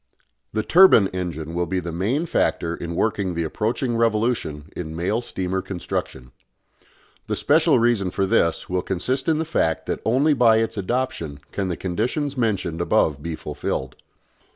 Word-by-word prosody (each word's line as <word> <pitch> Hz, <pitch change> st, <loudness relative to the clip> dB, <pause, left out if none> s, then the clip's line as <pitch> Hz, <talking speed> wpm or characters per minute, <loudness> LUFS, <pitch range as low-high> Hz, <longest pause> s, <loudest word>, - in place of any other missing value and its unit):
The 110 Hz, 0 st, -1 dB
turbine 115 Hz, -, +6 dB
engine 85 Hz, -4 st, -4 dB
will 85 Hz, 0 st, -1 dB
be 95 Hz, -, -1 dB
the 85 Hz, -1 st, -5 dB
main 110 Hz, -, 0 dB
factor 85 Hz, -, 0 dB
in 85 Hz, 0 st, -5 dB
working 100 Hz, -3 st, 0 dB
the 85 Hz, -, 0 dB
approaching 115 Hz, -, -1 dB
revolution 110 Hz, -10 st, 0 dB
in 80 Hz, -2 st, -5 dB
mail 95 Hz, +8 st, 0 dB
steamer 95 Hz, -4 st, -3 dB
construction. 75 Hz, -8 st, -5 dB, 1.0 s
The -, -, -1 dB
special -, -, +3 dB
reason 115 Hz, -5 st, +2 dB
for 95 Hz, +2 st, 0 dB
this 85 Hz, -3 st, +1 dB
will 90 Hz, 0 st, -1 dB
consist 130 Hz, -, -1 dB
in 160 Hz, -, +3 dB
the 160 Hz, -, -1 dB
fact 80 Hz, -, 0 dB
that -, -, -3 dB
only 135 Hz, +7 st, +3 dB
by 120 Hz, -4 st, +5 dB
its 115 Hz, 0 st, 0 dB
adoption 100 Hz, -, -2 dB
can 100 Hz, -2 st, -2 dB
the 90 Hz, -, -3 dB
conditions 125 Hz, -, -2 dB
mentioned 95 Hz, -9 st, -1 dB
above 75 Hz, -4 st, +2 dB
be 85 Hz, +1 st, -4 dB
fulfilled. 65 Hz, -4 st, -4 dB
95 Hz, 160 wpm, -23 LUFS, 85-120 Hz, 1.0 s, turbine